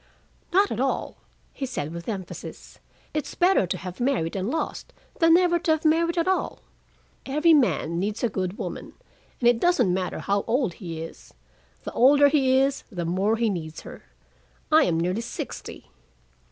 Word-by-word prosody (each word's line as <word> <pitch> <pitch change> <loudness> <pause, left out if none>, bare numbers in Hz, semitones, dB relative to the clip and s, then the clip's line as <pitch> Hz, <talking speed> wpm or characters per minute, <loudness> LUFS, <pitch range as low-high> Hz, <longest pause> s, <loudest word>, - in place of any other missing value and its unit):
"Not 395 +3 +3
at 225 - -3
all," 270 +1 -1 0.4
he 270 - -4
said 160 - -4
with 170 +5 -6
emphasis. 190 -5 -7 0.3
"It's 305 -2 -3
better 355 - +3
to 185 - -2
have 180 0 -8
married 240 -11 0
and 195 +2 -2
lost 320 +4 -4 0.3
than 330 0 +6
never 345 -1 +3
to 325 - 0
have 315 0 -3
married 335 +2 +2
at 335 - +1
all. 380 - -1 0.7
Every 305 +5 +4
man 205 - +2
needs 205 +5 -3
a - - +4
good 190 -2 -3
woman, - - -6 0.5
and 240 - +2
it 240 -1 +4
doesn't 350 - +3
matter 185 -1 -2
how 200 0 0
old 240 -5 +1
he 165 -3 -5
is. 165 - -12 0.5
The - - -5
older 285 +3 +5
he 265 -3 +3
is, 270 +1 +1
the 175 -4 -4
more 190 +6 +1
he 230 0 +1
needs 165 -6 -4
her. - - -11 0.7
I 310 -1 +6
am 165 -2 +1
nearly 180 +6 -1
sixty." 235 - -7
240 Hz, 175 wpm, -25 LUFS, 185-305 Hz, 0.7 s, than